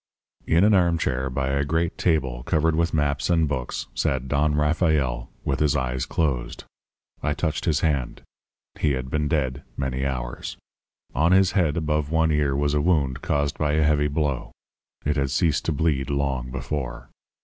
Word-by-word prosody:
"In 85 +3 +4
an 105 +1 +5
armchair 85 -8 +1
by 65 +1 -2
a 70 +1 +1
great 80 +3 0
table 65 -8 0
covered 80 +4 +1
with 85 +1 +1
maps 75 0 0
and 80 -2 +3
books 65 -3 -3
sat 65 -1 -1
Don 75 +2 +1
Rafael 75 -6 +1 0.2
with 70 - 0
his 75 -1 +2
eyes 65 -2 -1
closed. 70 -7 -1 0.6
I 75 -1 0
touched 80 -1 -2
his 80 -3 +1
hand. 70 -6 -1 0.6
He 75 - +2
had 65 -1 -4
been 75 -1 0
dead 70 -3 -1 0.2
many 65 -1 -2
hours. 65 -3 -4 0.6
On 80 +4 +3
his 95 0 +5
head 85 -5 +1
above 75 -2 0
one 80 0 +2
ear 75 -2 +1
was 70 +1 +1
a 75 - +2
wound 70 -6 +1
caused 70 -1 -1
by 75 -1 +1
a 80 0 +3
heavy 75 -1 +3
blow. 75 -3 -2 0.5
It 75 +1 +1
had 70 -1 +1
ceased 75 +1 +1
to - - +1
bleed 70 -3 0
long 70 -3 -1
before. 65 0 -4
75 Hz, 170 wpm, -24 LUFS, 65-80 Hz, 0.6 s, an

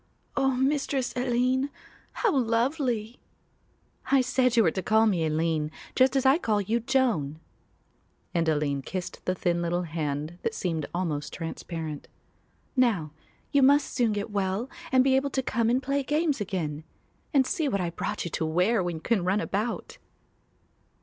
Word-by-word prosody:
"Oh, 270 -1 +3
Mistress 270 0 0
Aline, 255 +2 +1 0.4
how 450 -9 +1
lovely!" 240 -1 0 0.9
"I 275 -1 +6
said 255 -1 +1
you 225 - +7
were 165 - +3
to 190 - -3
call 220 +3 +4
me 185 -7 +2
Aline, 155 -1 0 0.3
just 260 +1 +4
as 270 - +2
I 270 +5 +5
call 215 - +1
you 215 +4 0
Joan," 230 - 0 0.9
and 165 -1 +1
Aline 145 -2 0
kissed 180 +5 -6
the 185 - +1
little 175 0 +1
thin 165 - -9
hand 155 +1 -3
that 225 - -2
seemed 160 -5 -2
almost 165 -5 -2
transparent. 165 -2 -5 0.7
"Now 215 - +2 0.4
you 285 - +4
must 280 +2 +4
soon 240 -4 +2
get 205 +1 -3
well 200 +5 -1 0.2
and 260 -1 +5
be 265 0 +3
able 275 +1 +1
to 265 -1 -1
come 230 -3 +1
and 255 +3 +1
play 280 +1 0
games 295 -2 0
again; 160 -7 -3 0.5
and 270 -2 +4
see 315 -1 0
what 200 - 0
I 175 -2 -1
brought 205 +4 -3
you 170 - -4
to 160 - -1
wear 180 +7 +2
when 175 -2 -2
you 160 - -7
can 220 -6 +1
run 185 +3 +2
about." 215 +3 -3
220 Hz, 165 wpm, -27 LUFS, 170-260 Hz, 0.9 s, you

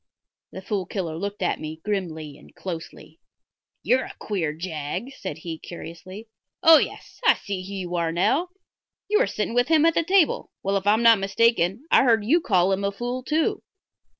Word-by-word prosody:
The 190 - -9
Fool 190 -2 -2
Killer 170 -6 -4
looked 200 +3 -4
at - - 0
me 155 0 -7
grimly 160 -8 -3
and - - -18
closely. 170 -3 -8 0.6
"You've 260 +1 +3
a - - -7
queer 180 -8 -2
jag," 165 - -5
said 185 - -6
he, 160 0 -7
curiously. 185 +5 -10 0.4
"Oh, 325 -2 +9
yes; - - -5
I 460 - +6
see 200 -3 -5
who 200 - -7
you 180 -2 -5
are 165 -1 0
now. 265 - +1 0.6
You 425 +1 +3
were - - +3
sitting 215 - -3
with 245 0 +2
him 320 -1 +4
at 330 - +4
the 330 - +1
table. 365 -1 +2
Well, 195 +1 0
if 195 0 -1
I'm 215 +3 +4
not 230 -2 +7
mistaken, 205 - +1
I - - +6
heard 225 -4 +3
you 325 +9 +3
call 185 - +2
him 195 +1 0
a 200 - 0
fool, 245 +5 -4
too." 320 - 0
200 Hz, 190 wpm, -24 LUFS, 175-245 Hz, 0.6 s, Oh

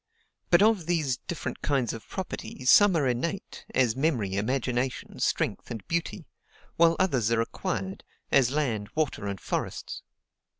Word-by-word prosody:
But 175 +3 +6
of 210 -7 +3
these 155 -8 +1
different 170 +4 -5
kinds 135 -6 0
of 115 -1 -9
property 185 -8 -6
some 200 +7 +7
are 145 -4 +2
INNATE, 150 +11 -3
as 120 -4 +3
memory, 130 -9 0
imagination, 125 +3 -1
strength, - - -1
and 110 -5 -7
beauty; 170 0 -2 0.5
while 165 0 +5
others 130 - +1
are 115 - +3
ACQUIRED, 190 +10 -3 0.3
as 135 -4 +5
land, 120 -8 -1
water, 140 -9 -1
and 100 -1 -4
forests. - - -4
135 Hz, 140 wpm, -27 LUFS, 115-170 Hz, 0.5 s, some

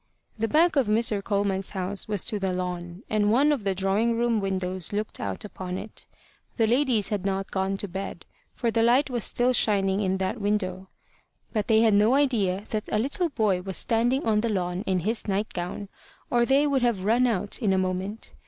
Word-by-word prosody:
The 225 0 -1
back 325 +6 +3
of 265 -5 +3
Mr. 215 -2 +1
Coleman's 200 -2 -1
house 190 +2 -2
was 205 -4 -1
to 210 - 0
the 190 -1 -1
lawn, 180 +1 -5
and 210 -1 +1
one 280 +6 +4
of 275 -7 -1
the 195 -1 0
drawing 200 +5 +1
room 235 -1 +1
windows 185 -2 -3
looked 210 +1 -3
out 100 - -4
upon 185 -3 -6
it. 215 - -9 0.5
The 225 - +3
ladies 240 -3 +2
had 205 -3 -2
not 195 0 -2
gone 190 0 -1
to 205 - -4
bed; 190 +2 -6 0.3
for 235 -2 -1
the 225 - +1
light 250 +4 +3
was 240 -3 -1
still 245 +1 +1
shining 195 -4 +2
in 190 -1 0
that 190 +4 -2
window. 190 -2 -1 0.6
But 215 -3 -1
they 220 -1 +4
had 225 -2 +4
no 210 +5 +4
idea 210 -9 +1
that 215 -1 -3
a - - +2
little 285 +10 0
boy 210 -9 +1
was 190 -1 -2
standing 240 +4 +1
on 215 -2 +2
the 230 - -1
lawn 180 -3 -1
in 185 -2 +1
his 220 +6 -2
night 205 +2 -1
gown, 180 +3 -5 0.4
or 240 -1 +3
they 275 +2 +4
would 280 -3 +1
have 230 -6 0
run 240 +4 +3
out 205 -3 -1
in 210 -4 +2
a 190 - +2
moment. 185 +3 -3
210 Hz, 210 wpm, -26 LUFS, 190-230 Hz, 0.6 s, one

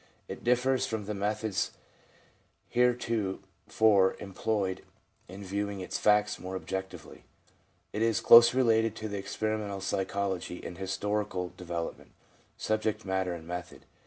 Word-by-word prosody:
It - - -8
differs 125 +2 +2
from 110 -2 -3
the 105 - -3
methods 105 -1 -1 1.0
heretofore 110 -4 +1
employed 95 -1 -2 0.4
in 95 +3 -9
viewing 100 +1 -3
its 90 - -4
facts 105 0 +3
more 95 +1 -6
objectively. 95 0 -6 0.7
It 105 - -2
is 115 0 +2
closely 120 +2 +8
related 115 -3 +3
to 110 -2 -5
experimental 105 0 -3
psychology 95 -2 -2
in 90 - -8
historical 95 -1 -2
development, 85 -2 -6 0.4
subject 110 -1 -1
matter, 95 -2 -1
and 80 -2 -10
method. 90 +1 -7
100 Hz, 115 wpm, -30 LUFS, 95-110 Hz, 1.0 s, closely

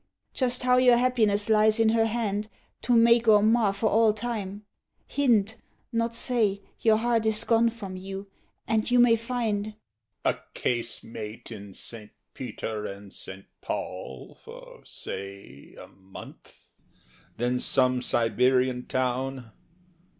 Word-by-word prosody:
Just 250 -1 -1
how 250 0 +4
your 250 -1 +6
happiness 225 -5 +2
lies 215 0 +4
in 225 -1 +4
her 225 0 +3
hand 210 -2 -2 0.3
To 245 - +2
make 235 0 +5
or 210 -2 +6
mar 220 -1 +3
for 200 +3 -1
all 220 0 +4
time; 210 -3 -5 0.4
hint, 225 -6 +1 0.3
not 230 0 -1
say, 215 -5 +2 0.2
Your 220 -1 +4
heart 230 -1 +1
is 215 -1 +2
gone 230 0 +3
from 205 -5 -8
you, 195 +1 -7 0.4
and 220 0 0
you 245 - +3
may 240 -1 +6
find 230 -3 -2
HE. 215 - -9 0.5
A - - +2 0.2
casemate 115 -2 -4
in 100 -3 -9
St. 110 -3 -8 0.2
Peter 110 -3 -5
and 100 0 -10
St. 95 +1 -9 0.2
Paul 65 - -6
For, - - -12
say, 100 -7 -8
a - - -11
month; 95 0 -15 0.7
then 125 +1 0
some 130 -1 +2
Siberian 125 +1 +1
town. 130 -1 -2
210 Hz, 135 wpm, -26 LUFS, -, 0.7 s, your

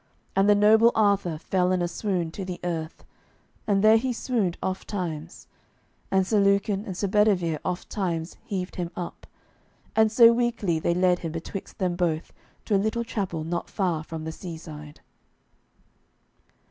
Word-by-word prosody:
And 195 +1 +4
the 205 - +7
noble 220 +3 +6
Arthur 200 -6 +2
fell 180 +3 0
in 185 - +2
a 175 - 0
swoon 175 -2 -2
to 195 - -6
the 180 -1 -5
earth, 165 -2 -4 0.6
and 200 -1 +2
there 220 +1 +7
he 255 +3 -1
swooned 225 -7 -1
ofttimes. 175 -4 -4 0.6
And 190 -1 +2
Sir 210 +2 +2
Lucan 200 +1 +2
and 185 -4 -6
Sir 200 - 0
Bedivere 185 -6 +2
ofttimes 175 -2 -3
heaved 185 -2 -4
him 175 -2 -2
up, 175 -1 -7 0.7
and 220 -1 +4
so 230 0 +7
weakly 230 -8 0
they 170 +2 0
led 180 0 +3
him 165 - -4
betwixt 170 +4 -7
them 180 -2 0
both 170 -3 -1 0.3
to - - -1
a 195 - +3
little 220 +3 -1
chapel 190 -8 -3
not 170 +2 -3
far 175 -6 -1
from 160 0 -7
the 160 - -4
seaside. 160 -4 -9
185 Hz, 160 wpm, -26 LUFS, 170-210 Hz, 0.7 s, the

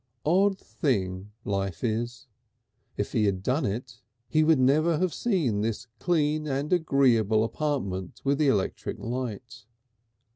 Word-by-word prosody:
Odd 190 +5 +3
thing 100 - -2
life 95 -3 -2
is! 120 +3 -2 0.7
If - - -2
he 105 - +2
had 95 -2 0
done 130 +5 +1
it 115 +3 -5 0.3
he 155 0 +3
would 160 -1 +5
never 150 +5 +3
have 185 +1 0
seen 155 - 0
this 115 +2 -2
clean 155 -3 +1
and 140 +3 -1
agreeable 125 - +3
apartment 115 - -3
with 140 +1 +1
the 150 - +3
electric 105 -8 0
light.... 120 -3 -5
130 Hz, 135 wpm, -27 LUFS, 105-155 Hz, 0.7 s, would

